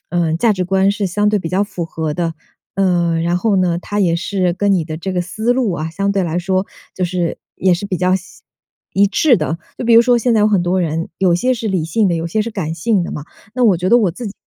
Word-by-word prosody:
嗯， 165 -2 0
价 225 +5 +3
值 185 -2 -2
观 190 +2 +2
是 200 -1 -1
相 205 +3 +1
对 210 0 +2
比 170 - -5
较 185 +4 +1
符 190 -4 -4
合 160 -1 -4
的。 165 +1 -2 0.4
呃， 175 -3 +1
然 170 +1 0
后 215 +2 +1
呢， 180 -3 +1
他 205 +3 -3
也 170 -4 +2
是 185 0 -1
跟 200 +3 +1
你 180 -4 +1
的 155 0 -6
这 190 +4 -4
个 180 - 0
思 215 +7 -1
路 245 -4 0
啊， 160 0 -4
相 200 +4 -1
对 195 -2 0
来 165 0 -2
说 190 +1 0 0.3
就 185 - -1
是， 175 -1 -2 0.2
也 185 -1 +2
是 175 - -5
比 190 -2 -2
较 185 +2 +2
像 185 - -9 0.7
一 200 +1 +4
致 245 +6 +3
的。 160 0 -2 0.2
就 - - -5
比 235 - +3
如 230 - +8
说 240 +1 +3
现 240 +1 +1
在 220 - +3
有 210 - +4
很 200 -4 +2
多 180 +1 0
人， 165 0 -2
有 185 -2 +3
些 250 +9 +1
是 230 -3 -3
理 185 -5 0
性 195 +6 +1
的， 175 - +1
有 165 0 -2
些 195 +6 -1
是 225 +2 -2
感 180 -7 -3
性 185 +4 0
的 - - -5
嘛。 145 - -6 0.3
那 255 - -1
我 205 -6 +5
觉 180 +2 -1
得 240 - +6
我 205 -6 +2
自 235 +8 -7
己 200 - -5
185 Hz, 295 characters per minute, -17 LUFS, 170-205 Hz, 0.7 s, 如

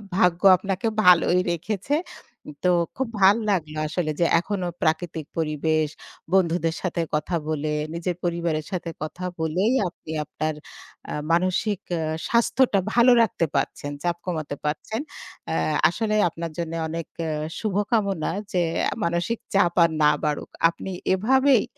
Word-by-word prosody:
ভাগ্য 180 -4 +3 0.2
আপনাকে 195 +3 -2 0.2
ভালোই 180 0 +6
রেখেছে। 200 - -2 0.7
তো 180 - +5 0.2
খুব 265 -2 -1
ভাল 195 +2 +7 0.2
লাগলো, 155 -5 -2
আসলে 155 0 -1
যে 170 - +4
এখনো 185 -1 -3
প্রাকৃতিক 160 -1 -1
পরিবেশ 155 0 +1 0.5
বন্ধুদের 170 -3 +2
সাথে 175 -2 -1
কথা 155 +3 -1
বলে, 155 -1 -1 0.2
নিজের 170 +1 -2
পরিবারের 170 -3 -1
সাথে 175 -2 -3
কথা 180 +4 -6
বলেই, 180 +9 +1 0.2
আপনি 160 -2 -11
আপনার 155 +1 -3 0.6
আ - - -3 0.2
মানসিক 185 +4 +1 0.2
আ - - -1 0.3
স্বাস্থ্যটা 235 -2 +3
ভালো 240 +1 +6
রাখতে 190 -6 +1
পারছেন, 145 +1 -1
চাপ 175 -1 0
কমাতে 155 -5 -3
পারছেন। 190 - -2 0.5
আ - - 0 0.3
আসলে 215 +4 -1
আপনার 165 0 -6
জন্য 165 -1 -3 0.2
অনেক 165 0 -4 0.2
আ - - -2 0.3
শুভকামনা, 205 -4 0 0.2
যে 180 - +1 0.4
মানসিক 170 +7 -1
চাপ 175 -3 +3
আর 170 - +4
না 150 - +6
বাড়ুক। 150 -1 -1 0.2
আপনি 180 +3 -7 0.2
এভাবেই 260 +5 +4
175 Hz, 135 wpm, -24 LUFS, 160-200 Hz, 0.7 s, ভাল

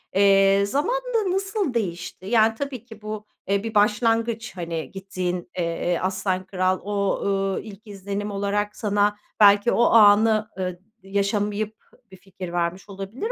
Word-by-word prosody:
eee, 195 0 +5
zamanla 485 - -1 0.2
nasıl 390 - -1
değişti? 180 -4 -4
Yani, 225 0 +3
tabii 260 -3 -5
ki 225 -3 -13
bu, 215 0 -6 0.2
eee, 200 +1 +1
bir 225 -1 -5
başlangıç, 225 +2 +1
hani, 165 -2 -4
gittiğin, 180 -2 -4
eee, 170 0 -1
"Aslan 185 0 -1
Kral" 185 -1 0
o, 200 -1 -1
ııı, 195 -1 0
ilk 215 0 -12
izlenim 200 +1 -5
olarak 205 +1 -1
sana 205 0 +1 0.2
belki 205 +2 +6
o 235 - +3
anı, 215 0 +5
ııı, 180 -1 -3 0.2
yaşamayıp 205 +2 -1 0.3
bir 190 - -12
fikir 185 -2 -9
vermiş 175 +3 -2
olabilir 200 - -5
200 Hz, 140 wpm, -24 LUFS, 190-220 Hz, 0.3 s, belki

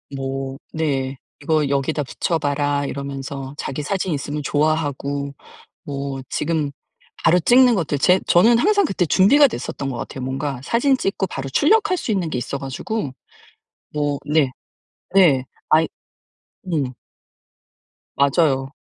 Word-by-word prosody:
뭐 135 0 -4
네. 135 -4 -1 0.2
"이거 155 -3 +1
여기다 140 +2 0
붙여봐라." 145 0 -1
이러면서 140 0 -5
자기 135 +2 -4
사진 185 +2 -1
있으면 145 +1 -3
좋아하고 145 -2 -1 0.5
뭐 140 -1 -4
지금 150 -2 -1 0.5
바로 180 - +5
찍는 245 +6 +5
것들 160 -6 -1
제 180 +6 +4
저는 225 +7 +5
항상 405 - +3
그때 190 - 0
준비가 245 - +6
됐었던 140 - -5
것 125 - -4
같아요. 130 +2 -6
뭔가 135 0 -3
사진 260 - +2
찍고 195 -4 -1
바로 135 -4 -5
출력할 420 - +3
수 230 - -3
있는 185 -5 0
게 130 - -2
있어 125 +3 -3
가지고 135 - -4 0.8
뭐 145 -1 -1
네. 150 -3 +2 0.7
네. 150 -9 +5 0.2
아이 160 +1 +4 0.9
음. 140 -5 0 1.2
맞아요. 140 -1 +2
145 Hz, 260 characters per minute, -21 LUFS, 135-180 Hz, 1.2 s, 준비가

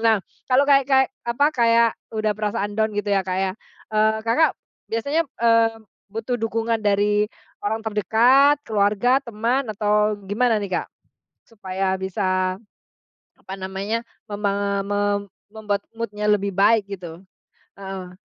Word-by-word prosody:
Nah 220 -2 +4 0.3
kalau 260 +2 +5
kayak 275 -1 +5
kayak 265 -1 +4 0.2
apa, 240 +5 +2
kayak 235 -4 +4 0.3
udah 215 -1 +1
perasaan 205 -1 -2
down 220 -1 +1
gitu 205 0 -2
ya 195 -1 +2
Kak 185 0 -1
ya, 190 0 0 0.4
eee, 215 0 +3
Kakak, 305 +8 +3 0.4
biasanya, 280 +9 0 0.2
eee, 230 -1 +4 0.4
butuh 225 +3 -2
dukungan 225 0 -1
dari, 205 0 +2 0.4
orang 220 +2 0
terdekat 235 +7 +4
keluarga, 215 +5 +2
teman 235 +4 -1
atau 210 0 +1
gimana 225 +1 +2
nih 200 - -5
Kak? - - -13 0.6
Supaya 190 -3 -2
bisa, 185 -1 -1 0.8
apa 190 - -8
namanya 195 +4 -3 0.3
mema 200 -1 -1
me 205 0 -1 0.5
membuat 210 -2 -3
mood-nya 210 -2 -3
lebih 200 -1 +2
baik 200 +3 +4
gitu? 175 +1 -10 0.6
Heeh, 190 -2 -7
210 Hz, 130 wpm, -22 LUFS, 200-230 Hz, 0.8 s, kalau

